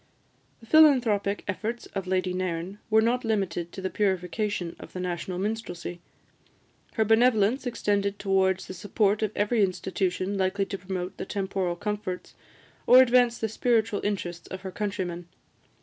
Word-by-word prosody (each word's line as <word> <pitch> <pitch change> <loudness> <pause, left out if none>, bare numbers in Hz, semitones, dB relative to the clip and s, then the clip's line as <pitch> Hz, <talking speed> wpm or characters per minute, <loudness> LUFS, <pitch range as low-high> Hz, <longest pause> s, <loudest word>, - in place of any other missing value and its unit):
The - - -14
philanthropic 235 -9 +4
efforts 220 +4 -3
of 195 -1 -3
Lady 185 -1 0
Nairn 185 +1 -3
were 220 0 +5
not 245 +2 +1
limited 190 -6 -1
to 195 - -6
the 190 - -1
purification 190 -1 -1
of - - -11
the 185 - -5
national 180 0 -3
minstrelsy; 185 -4 -4 0.9
her 220 - +1
benevolence 225 +2 +3
extended 200 -4 0
towards 190 -1 +1
the - - -7
support 205 +2 0
of 215 -2 0
every 210 +2 +2
institution 185 +1 -1
likely 190 +1 +1
to 195 - -5
promote 185 -1 -5
the - - -4
temporal 190 -3 -2
comforts, 205 -1 -4 0.5
or 250 - +9
advance 245 -2 +5
the 220 - -1
spiritual 225 -1 +1
interests 175 -4 -3
of 190 - -7
her 190 -1 -6
countrymen. 185 -4 -4
200 Hz, 150 wpm, -27 LUFS, 185-220 Hz, 0.9 s, or